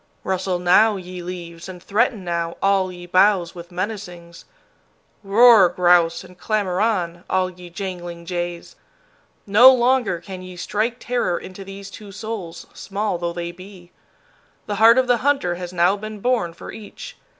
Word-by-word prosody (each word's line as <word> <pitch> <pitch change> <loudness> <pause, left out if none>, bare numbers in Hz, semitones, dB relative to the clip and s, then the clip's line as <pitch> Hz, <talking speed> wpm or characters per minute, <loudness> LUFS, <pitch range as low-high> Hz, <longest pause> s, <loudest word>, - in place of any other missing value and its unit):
Rustle 185 -1 -1
now, 185 +5 +4
ye 180 -1 -8
leaves, 175 0 -8
and 185 - -8
threaten 220 0 0
now, 170 -1 -3
all 195 -1 +1
ye 175 -1 -10
boughs 185 -1 +3
with 175 -1 -10
menacings. 180 -3 -6 0.8
Roar, 210 -1 +6
grouse, 175 -1 +3
and 180 0 -15
clamor 200 -4 -1
on, 180 -6 -1
all 185 0 +1
ye 180 -1 -13
jangling 175 -2 -7
jays. 175 -1 -5 0.7
No 225 +6 +8
longer 245 -7 +2
can 185 +2 -9
ye 185 0 -10
strike 215 +6 -1
terror 240 -8 -1
into 190 +1 -9
these 195 0 -10
two 205 -1 -11
souls, 205 -5 -7
small 200 -2 -3
though 170 0 -2
they 170 0 -5
be. 185 0 -14 0.7
The 205 - -4
heart 230 +2 +7
of 260 - +4
the 245 -1 +3
hunter 270 -9 +1
has 175 0 -7
now 180 +2 +3
been 215 +1 -8
born 230 -7 0
for - - -10
each. - - -10
185 Hz, 160 wpm, -21 LUFS, 175-210 Hz, 0.8 s, No